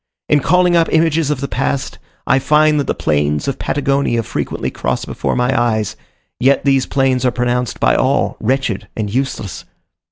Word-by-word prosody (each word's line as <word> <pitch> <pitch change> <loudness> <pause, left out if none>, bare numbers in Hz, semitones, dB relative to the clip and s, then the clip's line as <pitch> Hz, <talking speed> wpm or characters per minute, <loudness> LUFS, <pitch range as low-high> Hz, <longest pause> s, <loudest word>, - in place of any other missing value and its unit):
In 150 - +3
calling 180 +4 +3
up 165 -1 +2
images 160 -1 +2
of 150 -3 -1
the 140 - -2
past, 135 +1 -2 0.3
I 135 - +3
find 150 +2 +3
that 140 - -2
the - - -1
plains 75 - 0
of 135 - -2
Patagonia 140 -4 0
frequently - - -3
cross - - -2
before - - -3
my 125 +2 +1
eyes; 110 -4 0 0.4
yet 135 +3 +2
these 135 -2 +2
plains 135 -2 +1
are 125 - +3
pronounced 125 0 -1
by - - +3
all - - +1
wretched 130 -4 -1
and 105 -2 -3
useless. 125 -7 -3
135 Hz, 170 wpm, -17 LUFS, 120-145 Hz, 0.4 s, In